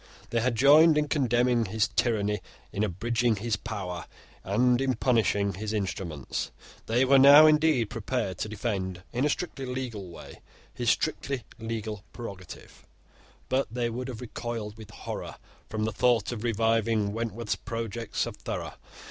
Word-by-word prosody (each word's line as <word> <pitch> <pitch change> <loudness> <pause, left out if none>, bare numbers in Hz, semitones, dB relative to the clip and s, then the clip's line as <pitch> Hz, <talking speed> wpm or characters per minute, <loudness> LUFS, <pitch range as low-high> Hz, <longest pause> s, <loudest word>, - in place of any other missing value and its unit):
They 115 - +1
had 125 0 +1
joined 150 +6 +7
in 150 -1 +1
condemning 120 -4 +2
his 105 +2 0
tyranny, 105 -3 +1 0.3
in 100 - 0
abridging 115 +4 0
his 110 +2 -1
power, 90 -4 -5 0.4
and 120 +6 +2
in 130 -1 +1
punishing 105 -4 +2
his 105 +3 -4
instruments. 95 -8 -3 0.4
They 120 +4 +3
were 135 +1 +6
now 140 +3 +10
indeed 150 -7 +3
prepared 110 -4 -3
to 110 - -2
defend 95 -4 -3
in 125 +4 +1
a - - +2
strictly 140 -4 -3
legal 125 -7 -5
way 85 - -12 0.3
his - - -1
strictly 135 -4 0 0.2
legal 110 -2 -4
prerogative; 100 -7 -10 0.6
but 130 +1 +1
they 120 0 -1
would 125 +3 -4
have 125 -3 -7
recoiled 115 -3 -5
with 110 -2 -12
horror - - -6 0.3
from 110 -1 -2
the 110 - -1
thought 115 0 +2
of 115 -2 -5
reviving 115 -2 +1
Wentworth's 115 0 -2
projects 115 -1 -3
of - - -7
Thorough. - - -5
115 Hz, 150 wpm, -28 LUFS, 105-125 Hz, 0.6 s, now